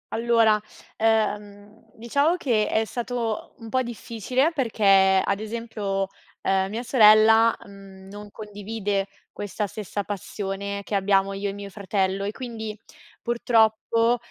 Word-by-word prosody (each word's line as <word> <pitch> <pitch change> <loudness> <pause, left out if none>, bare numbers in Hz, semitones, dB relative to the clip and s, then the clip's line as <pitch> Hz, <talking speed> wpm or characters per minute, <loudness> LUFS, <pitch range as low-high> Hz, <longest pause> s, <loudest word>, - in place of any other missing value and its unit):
Allora, 225 -2 +3 0.4
ehm, 210 -1 -1
diciamo 280 +9 +1
che 235 -11 +1
è 220 - +1
stato 235 -1 -4
un 225 -1 -9
po' 260 +2 +1
difficile 240 - -1
perché 195 -8 +4
ad 200 0 0
esempio, 215 -3 -3 0.3
uhm, 190 0 +1
mia 225 +4 -4
sorella, 225 -1 +6
mhmm, 195 -1 -14
non 205 +1 -10
condivide 205 -1 -4 0.2
questa 205 +1 -4
stessa 205 +1 -5
passione 200 0 -5
che 205 - -4
abbiamo 195 0 +2
io 195 +1 -3
e 195 - -3
mio 200 0 -8
fratello 195 -1 -1
e 205 - -2
quindi 220 -3 -6 0.4
purtroppo, 230 0 +2
210 Hz, 125 wpm, -24 LUFS, 200-230 Hz, 0.4 s, sorella